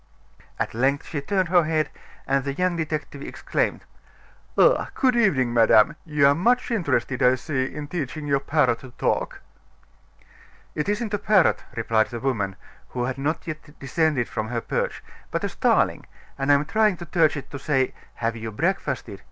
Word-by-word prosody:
At - - -2
length 135 +5 +1
she 145 -4 -4
turned 185 +4 0
her 175 -1 +5
head, 155 -1 0 0.3
and 135 0 +1
the 140 0 -2
young 180 +1 +1
detective 155 -3 -4
exclaimed: - - -2 0.7
"Ah! - - +4
good 255 -3 +3
evening, 145 - +2
madame; 115 +3 +5
you 150 -3 +2
are 140 - +6
much 240 +11 +1
interested, 135 - 0
I 125 +1 +5
see, 130 0 -2
in 145 +2 -6
teaching 155 -2 -4
your 140 -1 +2
parrot 140 -4 +1
to 130 - -11
talk." - - -1 1.3
"It 150 +6 -2
isn't 210 +1 -1
a 205 - +1
parrot," 205 -4 +3
replied 115 -1 +2
the 120 - -6
woman, 110 -7 -1 0.3
who 125 - -3
had 130 +2 -3
not 150 +4 -2
yet 155 -2 -8
descended 140 -2 0
from 110 -1 -3
her 120 0 -2
perch; - - -2 0.3
"but - - -2
a - - 0
starling, - - +1 0.3
and 135 +1 +1
I - - +8
am 140 +1 +1
trying 210 +3 +2
to 175 - -8
teach 165 -3 +2
it 140 - -8
to 140 - -6
say 135 -2 +1 0.2
'Have 115 0 -2
you 115 0 -5
breakfasted? 135 - -2
145 Hz, 175 wpm, -24 LUFS, 130-170 Hz, 1.3 s, I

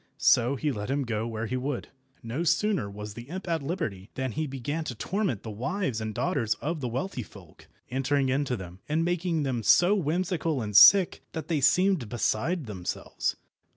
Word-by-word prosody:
So 125 +3 +4
he 150 +2 -1
let 105 -2 -5
him 140 +1 0
go 115 -2 -2
where 115 -1 -3
he 125 - -3
would. 130 0 -3 0.3
No 120 +8 -3
sooner 175 - +1
was 105 +1 -7
the 120 +4 -10
imp 185 +3 -6
at 165 -2 0
liberty 135 - -4
than 130 -1 -2
he 155 +5 -2
began 140 +4 -3
to 125 - -4
torment 185 - -2
the 110 - -6
wives 130 - -2
and 110 -1 -4
daughters 135 -11 0
of 160 0 -4
the 125 - -1
wealthy 130 +4 -3
folk, 95 -6 -14 0.2
entering 135 +1 +1
into 130 -1 0
them, 90 -1 -9
and 160 +2 +1
making 175 -2 0
them 130 -4 -1
so 175 - +5
whimsical 170 -3 0
and 105 -3 -4
sick 170 - +8
that 160 +1 -5
they 155 -4 +1
seemed 180 - +3
beside 130 - 0
themselves. 95 -5 -3
135 Hz, 190 wpm, -28 LUFS, 110-165 Hz, 0.3 s, sick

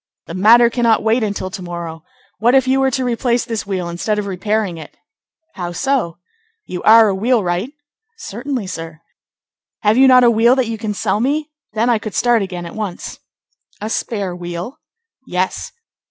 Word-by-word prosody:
"The - - -8
matter 230 +6 +6
cannot 230 -3 +2
wait 225 +3 +2
until 200 -3 -3
to 185 - -6
morrow. 170 -2 -6 0.4
What 240 +4 +3
if 265 -1 +4
you 265 +1 +3
were 270 0 +3
to 260 0 -1
replace 240 0 0
this 225 -4 -4
wheel 185 -3 -2
instead 175 +5 -2
of 210 - -2
repairing 200 -1 -2
it?" 155 - -12 0.6
"How 175 -3 -5
so?" 250 -6 -1 0.5
"You 180 - -6
are 220 0 +7
a - - 0
wheelwright?" 205 +1 0 0.4
"Certainly, 245 - -4
sir." 165 -3 -7 0.8
"Have 210 +2 +3
you 265 +1 +7
not 255 -1 +7
a 240 - +6
wheel 235 +3 +4
that 260 -2 +1
you 225 -1 -4
can 210 -2 -3
sell 205 - 0
me? 295 +5 -1 0.2
Then 225 +2 +1
I 235 -3 +3
could 215 -1 -7
start 240 -2 +3
again 180 -3 -5
at 170 - -8
once." 210 -5 -6 0.6
"A 215 +2 -4
spare 200 -7 -2
wheel?" 175 +7 -6 0.5
"Yes." 185 +1 -2
215 Hz, 180 wpm, -18 LUFS, 185-240 Hz, 0.8 s, are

